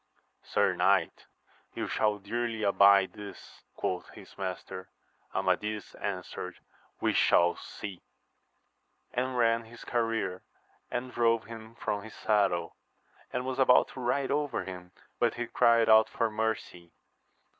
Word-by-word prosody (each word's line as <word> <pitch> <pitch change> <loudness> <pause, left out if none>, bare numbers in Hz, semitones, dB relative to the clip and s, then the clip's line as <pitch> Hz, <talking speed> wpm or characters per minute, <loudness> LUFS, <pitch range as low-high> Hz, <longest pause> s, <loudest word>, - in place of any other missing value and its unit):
Sir - - +1
knight, - - +1 0.5
you - - -2
shall 105 -1 +1
dearly 115 +2 -3
abide 100 -1 +5
this, 105 -1 -11
quoth 90 -2 -3
his - - -14
master. 95 -1 -5 0.5
Amadis 105 0 -1
answered, 90 -2 -5 0.4
We - - +1
shall 85 0 +4
see! 95 -4 -8 1.1
and 125 +1 -1
ran 115 -1 +3
his 115 +1 -13
career 115 -6 -1 0.5
and 125 +1 -3
drove 115 -2 +2
him 115 0 -10
from 105 -3 -2
his 110 +1 -11
saddle, 100 -5 +1 0.6
and 125 0 -2
was 130 0 -3
about 130 -1 +5
to - - -10
ride 130 +2 0
over 145 0 0
him, 90 -1 -8 0.3
but - - +2
he - - -2
cried 115 -1 +4
out 110 0 +6
for 115 -1 0
mercy 105 -6 -3
110 Hz, 130 wpm, -30 LUFS, 100-120 Hz, 1.1 s, out